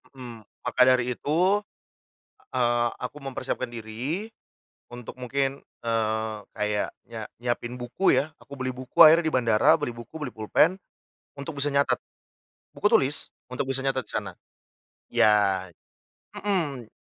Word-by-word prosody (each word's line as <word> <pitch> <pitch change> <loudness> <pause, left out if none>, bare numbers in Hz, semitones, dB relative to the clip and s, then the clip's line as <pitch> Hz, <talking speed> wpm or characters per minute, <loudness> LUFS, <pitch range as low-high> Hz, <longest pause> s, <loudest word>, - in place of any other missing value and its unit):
Mhm, 120 -4 -9 0.2
maka 130 - +1
dari 125 -1 +3
itu, 180 - +2 0.9
eee, 120 -1 +2
aku 125 +4 -5
mempersiapkan 130 -1 -3
diri, 120 - -4 0.6
untuk 120 0 -8
mungkin, 135 +2 -2 0.2
eee, 110 -1 -1 0.2
kayak 105 -1 -1 0.2
nyia 115 -2 -6 0.2
nyiapin 120 0 -3
buku 120 +11 +2
ya. 150 - +2
Aku 140 - -12
beli 130 - -1
buku 130 0 -4
akhirnya 165 +2 +9
di 160 - 0
bandara, 115 0 +4
beli 135 -5 -2
buku, 120 +7 -10
beli 145 - -3
pulpen 130 - +3 0.6
untuk 140 +2 -7
bisa 140 0 0
nyatet 140 0 +3 0.8
buku - - -1
tulis, 140 +2 +2 0.2
untuk 130 +1 -2
bisa 135 0 -2
nyatet 130 -4 -1
di - - -9
sana. - - -3 0.8
Iya, 100 -3 +3 0.7
mhm. 150 - -2
125 Hz, 135 wpm, -26 LUFS, 115-140 Hz, 0.9 s, akhirnya